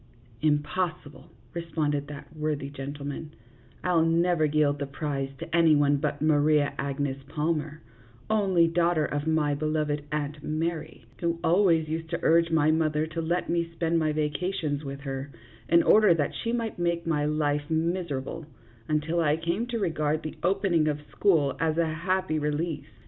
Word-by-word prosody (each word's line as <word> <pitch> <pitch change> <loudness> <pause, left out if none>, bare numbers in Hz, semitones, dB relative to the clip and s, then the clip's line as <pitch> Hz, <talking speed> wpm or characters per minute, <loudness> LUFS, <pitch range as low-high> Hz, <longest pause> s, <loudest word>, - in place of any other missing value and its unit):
" 115 -2 -27
Impossible," 150 -1 -3 0.2
responded 150 -4 -2
that 145 +2 -10
worthy 150 -2 -2
gentleman; 145 +2 -6 0.2
" 120 0 -28
I 180 - +1
'11 165 -1 +3
never 170 -2 +2
yield 145 -1 +2
the 140 - -3
prize 135 -1 -3
to 165 - -4
any 165 -2 +5
one 145 0 +3
but 145 0 -2
Maria 150 -1 +3
Agnes 140 0 -2
Palmer, 150 -2 -2 0.4
only 190 -6 +3
daughter 170 -1 +2
of 145 +1 -3
my 155 -2 +2
beloved 150 0 -1
Aunt 150 0 -3
Mary, 160 +1 -3
who 170 -1 -1
always 170 -3 +3
used 160 +1 -4
to 170 - -2
urge 165 +1 +4
my 155 -1 +3
mother 155 -1 +1
to 160 +1 -4
let 170 +2 -1
me 170 -1 0
spend 165 0 +1
my 155 -1 +1
vacations 150 0 -2
with 140 0 -6
her, 135 0 -5 0.4
in 170 +1 +5
order 210 -5 +6
that 145 -3 -1
she 230 - -3
might 230 -5 -2
make 170 -1 0
my 155 -3 +1
life 150 -1 0
miserable, 160 -3 -2 0.4
until 155 +3 0
I 155 -2 +2
came 170 +8 -2
to 240 -1 -2
re 195 -6 0
gard 155 0 -1
the 155 - -5
opening 180 -4 +2
of 150 -1 0
school 155 -9 +2
as 160 -1 0
a 170 - +3
happy 170 +1 -1
release. 150 +2 -2
155 Hz, 170 wpm, -27 LUFS, 145-170 Hz, 0.4 s, order